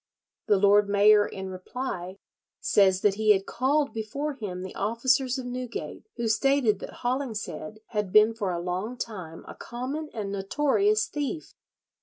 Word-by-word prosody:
The 205 - +4
lord 200 +1 +4
mayor 205 +1 +5
in 190 -1 -6
reply 185 -1 -5 0.4
says 190 -2 +3
that 205 - +3
he 215 -1 +6
had 195 -1 -1
called 280 +3 0
before 275 +7 -3
him 195 -8 -6
the 190 - -7
officers 255 +3 +1
of 260 - -5
Newgate, 245 - -6
who 235 -1 -2
stated 240 -3 +2
that - - -9
Hollingshead 220 - -3
had 210 -4 -2
been 215 +3 +6
for 210 -4 -3
a 175 - -2
long 185 +8 -3
time 185 -9 -7
a - - -8
common 270 +6 -5
and 205 -3 -4
notorious 295 - +1
thief. 300 - -4
220 Hz, 155 wpm, -27 LUFS, 200-260 Hz, 0.4 s, he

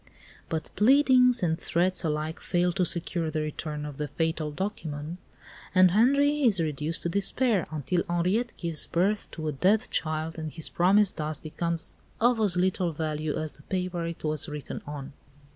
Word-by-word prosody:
But 160 -2 -3
pleadings 250 -1 +5
and 160 -2 +1
threats 180 +2 +1
alike 155 0 -2
fail 175 0 +1
to 180 0 +1
secure 170 -1 -1
the 155 0 -2
return 150 0 -4
of 145 -2 -7
the 150 - -2
fatal 160 0 -1
document, 160 -2 -5 0.6
and 185 -1 +7
Henri 280 +8 +3
is 225 -9 +4
reduced 155 0 -1
to 170 - 0
despair, 200 +2 +1
until 155 +3 -1
Henriette 185 +8 0
gives 170 -3 +3
birth 195 +5 0
to 155 -1 -6
a - - 0
dead 190 +10 +2
child 160 +1 -1
and 155 -1 -4
his 160 0 -7
promise 195 +3 +3
thus 155 -1 -4
becomes 165 +1 -4 0.3
of 240 0 +3
as 200 -5 +2
little 180 -1 +1
value 155 -1 -2
as 155 -2 -4
the - - -16
paper 180 +1 -3
it 170 - -7
was 155 +1 -1
written 150 -1 -6
on. 145 -1 -7
170 Hz, 170 wpm, -27 LUFS, 155-190 Hz, 0.6 s, and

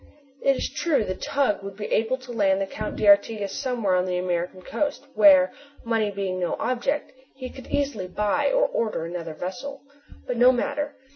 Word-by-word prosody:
It 275 0 +3
is - - -2
true 310 -9 0
the 185 - -2
tug 235 +1 0
would 195 0 -8
be 210 - -5
able 230 +4 +1
to 255 -1 -11
land 195 -4 +2
the 195 - 0
Count 210 +2 -5
d'Artigas 205 0 +3
somewhere 235 -7 -1
on 180 0 +2
the 180 -1 -1
American 180 0 -2
coast 285 +5 -2
where, 280 -2 +6 0.3
money 225 -2 +1
being 195 -2 -3
no 175 - -1
object, 255 +4 -1 0.2
he 255 -2 -7
could 260 - -11
easily 275 -10 -1
buy 210 - +1
or - - +3
order 225 - -2
another 165 -2 -5
vessel. 250 - -6 0.4
But 250 - -3
no 250 +2 +7
matter. 285 +3 -2
220 Hz, 185 wpm, -25 LUFS, 190-270 Hz, 0.4 s, no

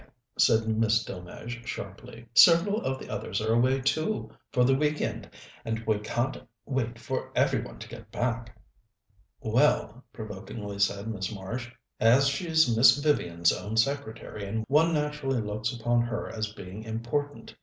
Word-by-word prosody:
said 110 0 +4
Miss 110 0 +2
Delmege 115 +6 -8
sharply. 115 0 -8
"Several 180 - +6
of 130 0 -2
the - - -10
others 100 - -3
are 110 +1 +1
away, 130 +3 +3
too, 155 +10 -1 0.2
for 125 -3 +3
the 135 +2 +4
week 150 +2 +1
end, - - -3 0.3
and 110 0 -3
we 110 -2 +1
can't 120 +5 -2 0.2
wait 125 -4 -2
for 130 +2 -4
every - - +2
one - - -9
to - - -9
get - - -11
back." 115 -1 -3 0.8
"Well," 125 0 +2
provokingly 105 -1 -7
said 100 +1 +1
Miss 100 -4 -3
Marsh, 115 +5 -6 0.3
"as 125 +5 +5
she's 160 -3 +2
Miss 125 +3 +7
Vivian's 85 - +2
own 105 +4 -4
secretary, 110 -4 -2
one 155 +4 +4
naturally 150 -4 -1
looks 110 +2 -2
upon 120 0 +1
her 120 0 -3
as 110 -2 -4
being 100 +1 -9
important. 120 +6 -4
115 Hz, 150 wpm, -28 LUFS, 110-135 Hz, 0.8 s, Miss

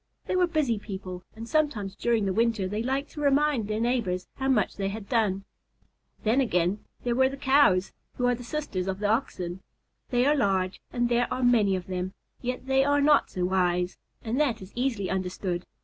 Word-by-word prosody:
They - - -1
were 365 -1 +4
busy 295 -10 +1
people; 190 -3 -7
and 225 +1 -7
sometimes 230 -11 0
during 230 -3 +1
the 190 - 0
winter 225 -3 +1
they 210 +3 -2
liked 270 +4 -2
to 295 - -7
remind 280 -5 +2
their 215 0 -1
neighbors 225 -7 0
how 265 - -1
much 230 -6 +2
they 195 -1 -1
had 205 0 -6
done. 210 -5 +1 0.8
Then 230 +5 +3
again, 180 -4 +1 0.2
there 240 - +1
were 260 +2 +4
the 275 - -7
Cows, 265 -9 +4 0.2
who 250 - 0
are 245 - +4
the 245 0 -6
sisters 235 -9 -3
of 190 0 -1
the 205 - -4
Oxen. 190 -5 -1 0.5
They 245 -1 +2
are 290 - +5
large 190 -7 0
and 240 -1 +1
there 240 0 +1
are 255 - -1
many 220 -6 +4
of 180 -1 -4
them, 185 +1 -4 0.3
yet 250 +1 -3
they 265 0 +3
are 285 +1 +3
not 290 +1 +4
so 180 -1 -2
wise, 180 -1 +1 0.2
and 235 +4 -1
that 270 -7 +1
is 190 +1 -12
easily 240 -6 -1
understood. 185 -1 -2
225 Hz, 200 wpm, -27 LUFS, 190-265 Hz, 0.8 s, are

